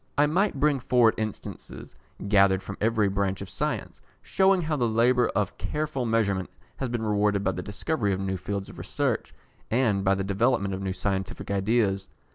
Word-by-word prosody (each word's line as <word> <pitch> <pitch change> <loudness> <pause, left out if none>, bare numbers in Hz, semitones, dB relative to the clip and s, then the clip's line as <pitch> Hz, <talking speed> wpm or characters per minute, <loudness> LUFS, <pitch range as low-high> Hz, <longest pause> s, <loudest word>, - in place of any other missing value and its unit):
I 145 - +5
might 175 0 +1
bring 145 -1 +3
forward 120 -2 +4
instances 110 -2 -6 0.3
gathered 100 -2 +4
from 100 - -6
every 110 -1 +2
branch 100 -1 -1
of 100 -1 -8
science, - - -3 0.2
shewing 190 -2 +3
how 155 -1 -1
the 125 -5 +1
labour 120 +2 +3
of 100 -2 -1
careful 150 -5 -2
measurement 100 -5 +1 0.3
has 130 - -3
been 120 -1 -2
rewarded 105 -1 +1
by 95 - +2
the 90 0 -5
discovery 105 - -2
of 95 - -1
new 95 -1 -2
fields 100 +1 -4
of - - -11
research, - - -2 0.4
and 110 -5 +2
by 95 0 +3
the 95 - -2
development 100 0 +1
of 95 - -4
new 95 -1 -2
scientific 95 +1 -3
ideas. 100 -1 +1
105 Hz, 180 wpm, -26 LUFS, 95-125 Hz, 0.4 s, I